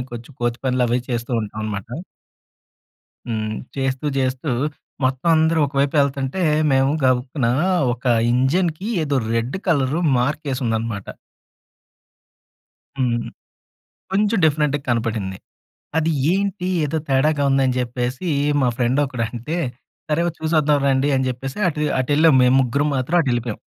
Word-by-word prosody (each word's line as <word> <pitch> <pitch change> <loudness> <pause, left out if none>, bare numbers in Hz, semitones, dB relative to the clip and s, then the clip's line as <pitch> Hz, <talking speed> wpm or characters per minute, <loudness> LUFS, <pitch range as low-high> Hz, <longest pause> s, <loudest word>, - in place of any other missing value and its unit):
మేము 125 - -4
కొంచెం 120 +4 -8
కో‌తి 120 0 0
పనులు 125 -1 +2
అవి 120 +1 +2
చేస్తూ 120 +1 -3
ఉంటాం 105 +1 -6
అనమాట. 105 +1 -4 1.4
హ్మ్. 110 -1 -2 0.2
చేస్తూ 135 +1 -1
చేస్తూ 130 +2 -1 0.5
మొత్తం 130 +5 0
అందరూ 160 0 +3
ఒకవైపు 140 +1 0
వెళ్తుంటే, 140 +5 0 0.3
మేము 135 +1 +3
గబుక్కున 130 0 +1 0.5
ఒక 125 - -21 0.3
ఇంజిన్‌కీ 160 - +1 0.2
ఏదో 140 -2 0 0.2
రెడ్ 115 +8 -1
కలర్ 140 -2 +2 0.2
మార్కేసి 140 +1 -1
ఉందన్నమాట. 110 -3 -2 1.9
హ్మ్. 120 -2 0 0.8
కొంచెం 210 +2 +2
డిఫరెంట్‌గా 150 -2 +2
కనపడింది. 110 -5 -1 0.6
అది 160 0 +2 0.2
ఏంటి 195 -1 -1 0.2
ఏదో 155 +2 -1
తేడాగా 145 +2 +2
ఉంది 135 0 +3
అని 130 0 0
చెప్పేసి, 125 +6 -3 0.3
మా 125 - +3
ఫ్రెండొకడంటే 125 +2 -1 0.5
సరే 150 +3 +2 0.2
చూసి 160 +1 -2
వద్దాం 150 -1 +2
రండి 135 +1 +2
అని 130 0 0
చెప్పేసి 130 - -5
అటు, 150 -2 -3 0.2
అటెళ్ళాం 145 +3 +4
మేము 125 +1 +4
ముగ్గురం 140 +4 +1
మాత్రం 130 +7 0
అటెళ్ళిపోయాం. 120 -5 -1
135 Hz, 125 wpm, -21 LUFS, 120-150 Hz, 1.9 s, అటెళ్ళాం